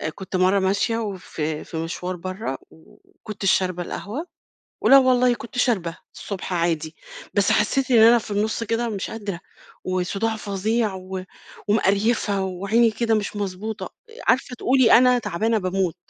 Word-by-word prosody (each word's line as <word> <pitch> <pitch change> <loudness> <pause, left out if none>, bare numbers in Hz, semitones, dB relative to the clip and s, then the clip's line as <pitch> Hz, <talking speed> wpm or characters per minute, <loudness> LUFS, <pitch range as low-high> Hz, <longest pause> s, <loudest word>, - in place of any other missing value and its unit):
كنت 190 -1 -7
مَرّة 185 +2 +3
ماشية 200 +4 +1
وفي 175 -7 -4
في 165 - -7
مشوار 180 +2 -4
برّا، 185 -3 -5
وكنتش 195 +4 -5
شاربة 180 -1 0
القهوة، 245 - -6 0.5
ولأ 275 - +7
والله 250 -1 +4
كنت 240 +2 -9
شاربة 185 -9 +1 0.2
الصبح 190 -2 -6
عادي، 165 -2 -1 0.4
بس 200 -1 +3
حسيت 260 +5 +1
إن 235 - +6
أنا 230 +2 +7
في 215 - -9
النُص 215 +3 -1
كده 230 +2 -1
مش 200 -4 -4
قادرة 205 -5 -5 0.4
وصداع 195 +5 -1
فظيع 210 +1 -1
و 185 0 -6 0.5
ومقريفة 205 0 +2
وعيني 200 +5 +2
كده 225 +1 0
مش 210 0 -2
مضبوطة، 205 +2 -5 0.3
عارفة 255 0 +2
تقولي 255 0 +3
أنا 250 0 +4
تعبانة 220 +2 0
باموت. 185 -2 -1
205 Hz, 140 wpm, -23 LUFS, 185-230 Hz, 0.5 s, ولأ